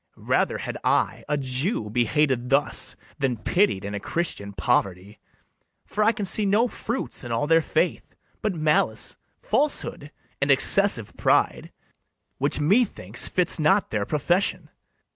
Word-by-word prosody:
Rather - - 0
had - - -6
I, - - +1
a 150 - +1
Jew, 130 - -1
be 120 +2 +2
hated 130 -2 0
thus, 140 +1 +1 0.2
Than 130 -4 0
pitied 110 - +1
in 100 - -5
a 100 - -3
Christian 100 - -3
poverty; 95 +2 -1 0.7
For 210 - -1
I 220 - +5
can 210 -3 -4
see 200 +3 +2
no 205 +4 +3
fruits 235 - -5
in 120 - -6
all 115 +4 0
their 165 +2 +4
faith, - - -2 0.3
But 210 -4 -1
malice, 155 -1 0 0.3
falsehood, 290 - -1 0.3
and 140 - +1
excessive 135 - +3
pride, - - +1 0.7
Which 140 +2 +1
methinks 150 - +1
fits 180 -2 +1
not 190 +6 +2
their 105 -2 -1
profession. 175 +2 0
150 Hz, 145 wpm, -24 LUFS, 120-195 Hz, 0.7 s, I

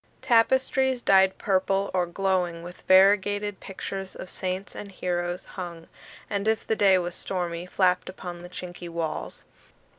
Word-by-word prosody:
Tapestries, 260 +1 +3
dyed 190 -1 +5
purple, 195 0 +1
or 180 -1 +1
glowing 180 -2 -1
with 175 +1 -10
variegated 205 +1 +4
pictures 195 0 -6
of 185 - -7
saints 185 +1 -4
and 200 - -8
heroes, 175 -1 -3
hung, 170 -3 -8 0.4
and 200 0 -2
if 220 -1 +1
the 220 - +1
day 195 -3 +5
was 175 -1 -2
stormy, 175 -2 -3
flapped 180 -1 +1
upon 175 -2 -7
the 175 - -10
chinky 175 -1 -7
walls. 165 -2 -4
185 Hz, 145 wpm, -26 LUFS, 175-200 Hz, 0.4 s, dyed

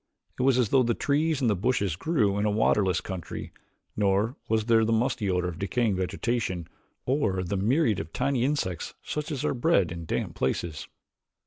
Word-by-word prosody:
It - - +1
was 130 -1 +4
as 120 -5 +2
though 135 - +4
the 120 -2 +1
trees 150 +1 +1
and 125 - +2
the 105 - +3
bushes 100 -4 0
grew 105 - +1
in 105 - +1
a - - +3
waterless 105 -3 +2
country, 95 -4 -6 0.4
nor 105 +4 +1
was 110 -1 +1
there 115 -1 +4
the 110 - +1
musty 115 -2 +1
odor 90 -1 +1
of 85 -2 -6
decaying 105 +2 0
vegetation 95 -2 -2 0.4
or 110 -9 +1
the 95 +3 -2
myriads 110 - +2
of - - -9
tiny 130 -1 0
insects 130 - -2
such 150 +1 -4
as 145 0 -2
are - - +1
bred 100 -8 +2
in 85 0 -6
damp - - -2
places. 75 +4 -2
110 Hz, 190 wpm, -27 LUFS, 95-125 Hz, 0.4 s, was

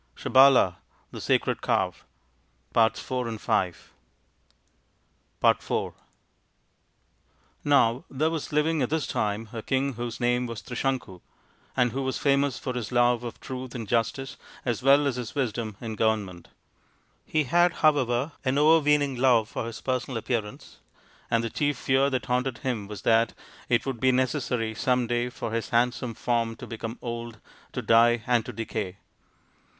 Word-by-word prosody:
SABALA, 130 -9 +5 0.3
THE - - -8
SACRED - - +1
COW - - +1 0.8
213 115 -3 +1 1.8
IV - - +1 1.7
Now 130 -4 +3
there 155 +4 0
was 160 -3 -4
living 150 +1 +1
at 125 - 0
this 160 0 0
time 105 +1 -2
a 115 - -4
king 135 +3 0
whose 120 0 -5
name 120 0 +1
was 115 -2 -7
Trisanku, 125 -8 -3 0.6
and 125 -1 +3
who 135 - -3
was 130 -1 -2
famous 140 -1 +2
for 130 - -4
his 125 -3 -4
love 120 -1 +3
of 120 - -7
truth 130 -1 -7
and 115 -3 -5
justice 120 +4 -1 0.3
as 120 -4 -1
well 140 +2 +5
as 135 -3 0
his 125 +3 -6
wisdom 115 -6 -2
in 115 -2 -5
govern 110 -1 +1
ment. 90 -2 -12 0.8
He 155 -1 0
had, 175 +6 +3
however, 135 -1 +2
an 130 0 +1
overweening 150 -3 +4
love 120 -4 +3
for 115 - -4
his 115 - -7
personal 130 -1 -2
appearance, 110 -2 -4 0.5
and 115 0 +2
the 115 - -3
chief 145 -2 0
fear 135 +2 +2
that 130 -2 -2
haunted 125 0 -1
him 115 -6 -3
was 105 -2 -8
that 115 0 +3 0.4
it 120 -1 +2
would 135 -4 -3
be 130 +1 +4
necessary 125 -3 0
some 125 +2 +1
day 120 +1 -1
for 115 - -5
his 115 0 -2
handsome 120 0 0
form 115 -1 -1
to - - -9
become 115 0 -6
old, 115 -1 -5 0.3
to - - -3
die 115 0 +4
and 120 -2 +1
to - - -4
decay. 100 -4 -4
120 Hz, 150 wpm, -26 LUFS, 115-135 Hz, 1.8 s, SABALA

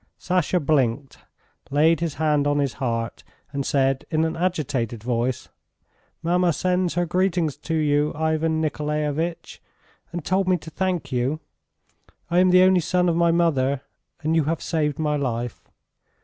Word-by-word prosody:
Sasha 180 0 +1
blinked, 135 -3 0 0.5
laid 155 +3 +3
his 165 -3 -2
hand 150 -2 +1
on 145 0 +1
his 140 -4 0
heart 115 -2 -2 0.3
and 140 0 -1
said 135 -1 +1
in 160 0 +1
an 160 - -2
agitated 140 - -2
voice: 120 +1 -1 0.7
"Mamma 175 0 +2
sends 180 +1 0
her 175 0 +1
greetings 175 -3 0
to 160 +2 -3
you, 150 -1 +2
Ivan 160 +1 0
Nikolaevitch, 150 +1 -2 0.5
and 175 -3 -5
told 190 0 +1
me 185 -1 +3
to 160 0 -11
thank 185 0 -2
you.... 130 +5 0 0.9
I 175 - +4
am 185 0 +5
the 185 0 +6
only 185 -1 +5
son 180 +2 +1
of 165 - +1
my 170 0 +3
mother 140 -6 +2 0.4
and 160 +2 0
you 160 -3 +2
have 165 +2 -2
saved 150 -4 -1
my 150 -1 0
life 120 -4 -4
155 Hz, 155 wpm, -23 LUFS, 140-175 Hz, 0.9 s, the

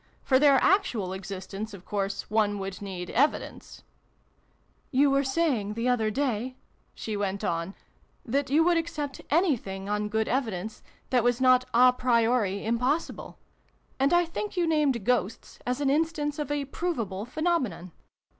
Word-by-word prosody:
For 260 -1 +3
their 285 -1 +6
actual 245 - +2
exist 190 0 -7
ence, 210 +2 -5
of 185 - -14
course, 200 -1 -3
one 210 -1 +1
would 195 0 -6
need 185 -3 -6
evidence" 285 +5 -1 0.5
" - - -40
You 285 0 +5
were 275 0 +3
saying, 265 -8 0
the 230 +2 -1
other 225 -3 +2
day," 255 0 -2 0.4
she 220 - -4
went 200 -1 -2
on, 170 +3 -2 0.2
" - - -38
that 280 -1 +1
you 305 +4 +4
would 345 0 +3
accept 310 -4 -4
anything, 245 - 0
on 210 0 -1
good 220 +1 0
evidence, 220 -5 -2 0.3
that 250 -3 +3
was 245 0 +2
not 255 -1 +5
a 250 +1 +7
priori 230 -5 +1
impossible. 250 +8 -1 0.6
And 275 +1 +3
I 350 0 +4
think 375 +4 -5
you 350 - +2
named 295 -9 +1
Ghosts 245 -4 -1
as 250 +3 -1
an 275 -1 +2
instance 300 -1 0
of 295 - -3
a 290 -1 -1
provable 235 - -3
phenomenon. 255 - -2
250 Hz, 160 wpm, -27 LUFS, 205-290 Hz, 0.6 s, a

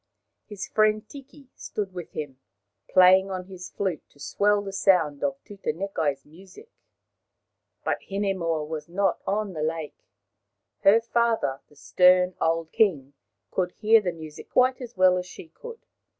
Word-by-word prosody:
His 205 -3 -7
friend 215 0 +1
Tiki 275 -1 -14
stood 200 -3 -5
with 175 -2 -8
him, 140 -4 -6 0.5
playing 185 +1 +6
on 185 -1 -5
his 185 -1 -10
flute 185 -6 -3
to 145 - -25
swell 205 +7 +1
the 195 -1 -7
sound 180 -7 +2
of 275 -1 -1
Tutanekai's 165 -7 -3
music. 190 - -16 1.1
But - - -1
Hinemoa 190 -6 -1
was 155 0 -6
not 195 +1 0
on 205 -1 -1
the 155 - -5
lake. 160 -1 -4 0.7
Her 215 +4 +5
father, 230 - 0
the 150 - -22
stern 180 +4 +4
old 165 0 0
king, 145 -11 +1 0.4
could 180 -1 -1
hear 220 +1 +4
the 180 -3 -2
music 160 -2 -11
quite 255 +1 +2
as 240 -4 -9
well 185 0 +5
as 180 - -7
she 170 - -12
could. 465 - -12
185 Hz, 150 wpm, -25 LUFS, 165-210 Hz, 1.1 s, playing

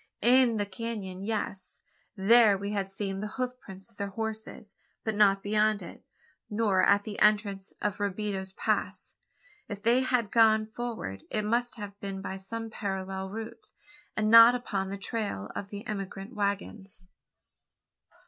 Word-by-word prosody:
In 245 -1 +5
the 205 - 0
canon, 195 -2 -5
yes. 205 -2 -4 0.4
There 210 +1 +6
we 200 +1 -4
had 200 -2 -2
seen 195 0 -4
the 210 - -3
hoof 255 -1 -1
prints 195 -4 -12
of 230 - -25
their 200 - -2
horses: 220 0 -6 0.3
but 220 - -1
not 200 -2 +4
beyond 215 0 +2
it, - - -11 0.5
nor 210 -3 +2
at 200 0 +4
the 205 -1 -6
entrance 205 -2 +2
of 205 -1 -1
Robideau's 200 -1 -2
Pass. - - -2 0.5
If 205 -1 -7
they 235 +3 +4
had 250 -5 0
gone 220 -1 +5
forward, 220 - -5
it 215 -1 -1
must 240 +3 0
have 205 -3 -8
been 195 -1 -5
by 190 0 -5
some 225 +4 -5
parallel 190 -2 -4
route, 225 +3 -8 0.5
and 215 0 +2
not 230 +1 +10
upon 195 -6 -3
the 200 - -4
trail 200 - -3
of 200 - -5
the 205 +2 -7
emigrant 195 -2 -5
waggons? 200 -2 -3
205 Hz, 155 wpm, -29 LUFS, 195-225 Hz, 0.5 s, not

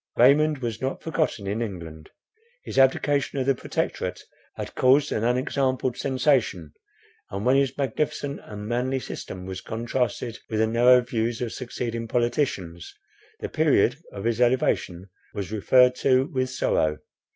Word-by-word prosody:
Raymond 145 +2 +4
was 115 -2 -3
not 130 +1 -3
forgotten 155 -10 -1
in 105 +4 -2
England. 85 -8 -7 0.5
His - - -2
abdication 140 +1 +2
of 130 - 0
the 135 - +4
Protectorate - - -3 0.3
had - - -6
caused 135 +3 +3
an 110 - -1
unexampled 130 +1 0
sensation; 130 - 0 0.6
and, 100 +3 -4
when 130 +2 +4
his 135 -1 +1
magnificent 140 +1 -2
and 105 0 -8
manly 125 +3 0
system 95 -5 -7
was 95 -1 -6
contrasted 120 0 -3
with 110 - -2
the 110 - +4
narrow 120 +3 +5
views 120 -1 -2
of 120 -2 -3
succeeding 120 -2 -4
politicians, 120 - -2 0.5
the - - -2
period - - +3
of 100 - -7
his 115 +1 0
elevation 100 -7 +1 0.2
was 100 -1 -4
referred 125 +4 +4
to 130 0 +3
with 130 -1 0
sorrow. 80 -11 0
120 Hz, 145 wpm, -25 LUFS, 110-130 Hz, 0.6 s, narrow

